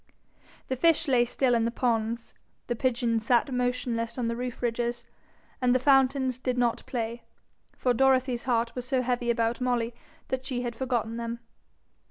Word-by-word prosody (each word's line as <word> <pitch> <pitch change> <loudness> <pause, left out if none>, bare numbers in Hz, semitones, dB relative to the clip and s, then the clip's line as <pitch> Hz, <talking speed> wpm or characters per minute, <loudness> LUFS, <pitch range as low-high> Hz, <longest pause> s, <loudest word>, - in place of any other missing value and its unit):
The 260 - -1
fish 330 +3 +3
lay 250 -3 +4
still 250 +1 +1
in 230 -1 +3
the - - +1
ponds, 230 -1 -1 0.3
the 240 - -2
pigeons 235 -2 0
sat 245 +2 +3
motionless 245 -2 -1
on 235 -2 0
the 230 - -2
roof 245 0 -5
ridges, 240 0 -1 0.6
and 250 0 +3
the - - +4
fountains 265 -1 +3
did 255 -1 -1
not 240 -1 +1
play; 235 -1 -3 0.6
for 250 - +2
Dorothy's 260 -1 +2
heart 235 -2 +1
was 250 0 -5
so 260 -1 +1
heavy 245 -1 -1
about 230 0 +1
Molly, 240 -2 0 0.4
that 260 0 -2
she 255 -2 -3
had 240 -1 -3
forgotten 235 -3 -1
them. 235 0 -3
245 Hz, 170 wpm, -28 LUFS, 235-255 Hz, 0.6 s, lay